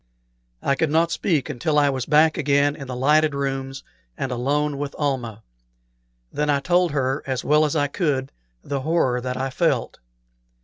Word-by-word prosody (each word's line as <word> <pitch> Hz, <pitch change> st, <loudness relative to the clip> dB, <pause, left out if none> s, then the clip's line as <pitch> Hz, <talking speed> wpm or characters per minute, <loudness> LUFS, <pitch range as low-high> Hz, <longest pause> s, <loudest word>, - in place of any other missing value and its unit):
I 140 Hz, -, +2 dB
could 155 Hz, +3 st, 0 dB
not 165 Hz, +2 st, +2 dB
speak 160 Hz, -8 st, 0 dB
until 150 Hz, +2 st, -1 dB
I 145 Hz, -1 st, +4 dB
was 130 Hz, -2 st, -4 dB
back 155 Hz, +1 st, +4 dB
again 145 Hz, -1 st, +2 dB
in 140 Hz, -3 st, -9 dB
the 125 Hz, -, -5 dB
lighted 150 Hz, +3 st, +3 dB
rooms 135 Hz, -1 st, -3 dB, 0.3 s
and 130 Hz, -, -3 dB
alone 140 Hz, +3 st, -1 dB
with 145 Hz, -1 st, -4 dB
Almah; 120 Hz, -7 st, -2 dB, 0.9 s
then 150 Hz, 0 st, -1 dB
I 145 Hz, -1 st, +3 dB
told 175 Hz, +4 st, +2 dB
her, 135 Hz, -1 st, -1 dB
as 130 Hz, -2 st, -2 dB
well 150 Hz, +1 st, +3 dB
as 150 Hz, -, -2 dB
I 145 Hz, -2 st, +2 dB
could, 140 Hz, -4 st, -1 dB, 0.3 s
the 140 Hz, -1 st, -3 dB
horror 130 Hz, -5 st, +1 dB
that 125 Hz, 0 st, -4 dB
I 135 Hz, +1 st, -2 dB
felt. -, -, 0 dB
140 Hz, 175 wpm, -23 LUFS, 130-150 Hz, 0.9 s, I